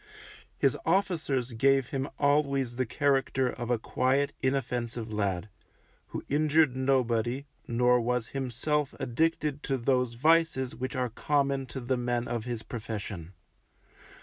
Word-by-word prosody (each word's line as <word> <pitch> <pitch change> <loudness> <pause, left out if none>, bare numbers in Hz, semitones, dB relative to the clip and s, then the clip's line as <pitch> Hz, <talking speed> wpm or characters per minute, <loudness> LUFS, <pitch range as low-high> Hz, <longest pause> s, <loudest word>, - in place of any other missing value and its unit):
His - - +3
officers 160 -8 +1
gave 135 +2 +3
him 135 0 -2
always 140 -4 +2
the 130 0 -1
character 135 -1 +1
of 120 -1 -6
a 120 - +3
quiet, 130 +5 +1
inoffensive 120 -4 -2
lad, 100 -2 -1 0.6
who - - -6
injured 150 -1 +3
nobody, 130 -1 +1 0.2
nor 125 +1 +3
was 120 -1 -1
himself 135 +3 -1
addicted 150 +2 0
to 135 -3 -1
those 125 -1 +1
vices 155 -2 +3
which 130 +3 -4
are 125 -1 0
common 140 +2 0
to 130 - -6
the 130 +1 -1
men 120 -1 -1
of 120 -2 -3
his 120 -3 -4
profession. 105 -6 -6
130 Hz, 130 wpm, -29 LUFS, 120-140 Hz, 0.6 s, His